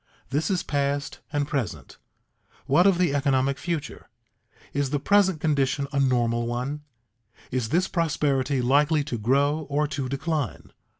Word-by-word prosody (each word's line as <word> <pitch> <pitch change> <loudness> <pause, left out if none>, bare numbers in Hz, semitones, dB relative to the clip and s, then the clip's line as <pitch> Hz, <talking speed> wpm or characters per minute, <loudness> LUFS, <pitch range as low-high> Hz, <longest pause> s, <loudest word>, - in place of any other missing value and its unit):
This 145 +7 0
is 185 -3 0
past 140 0 -2
and 145 -2 0
present; 100 - -4 0.7
what 145 +8 +4
of 195 -3 +4
the 175 -5 +2
economic 135 -1 +1
future? 165 -8 -4 0.6
Is 140 -1 0
the 145 +1 0
present 190 +1 +3
condition 140 -2 +1
a 140 - +1
normal 120 -3 +1
one 125 +5 -3 0.7
is 125 -3 -1
this 180 +4 +2
prosperity 140 -5 0
likely 145 +4 +3
to 125 -5 -4
grow 140 +7 +1
or 150 +1 +1
to 135 -3 -3
decline? 140 - -3
140 Hz, 140 wpm, -25 LUFS, 130-150 Hz, 0.7 s, what